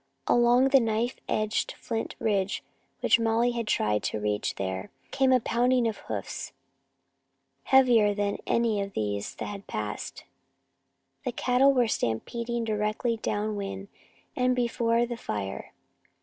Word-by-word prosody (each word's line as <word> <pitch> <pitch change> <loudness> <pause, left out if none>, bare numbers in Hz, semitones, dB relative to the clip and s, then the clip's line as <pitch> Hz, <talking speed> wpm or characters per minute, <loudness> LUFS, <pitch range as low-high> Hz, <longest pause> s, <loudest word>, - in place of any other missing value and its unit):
Along 240 +2 +4
the 270 0 +6
knife 230 +1 0
edged 215 0 0
flint 225 -1 -4
ridge 200 -2 0 0.4
which - - +4
Molly 230 +2 +2
had 235 -2 -3
tried 105 - +1
to - - -1
reach 105 0 -1
there 95 0 -4 0.2
came 265 -1 +2
the 255 -1 +5
pounding 245 +1 +2
of 220 - -2
hoofs, 105 -3 -5 1.1
heavier 240 -6 +5
than 205 0 -1
any 230 -3 +2
of 200 0 -5
these 105 -1 -2
that - - -5
had 200 -1 -7
passed. 105 -1 -5 1.0
The 250 - -1
cattle 250 +3 +3
were 250 -3 +3
stampeding 235 - -2
directly 215 +2 -1
down 215 -1 -2
wind 195 -1 -5 0.5
and 250 0 +2
before 235 -1 +1
the 240 0 -5
fire. 100 - -5
225 Hz, 135 wpm, -27 LUFS, 200-240 Hz, 1.1 s, the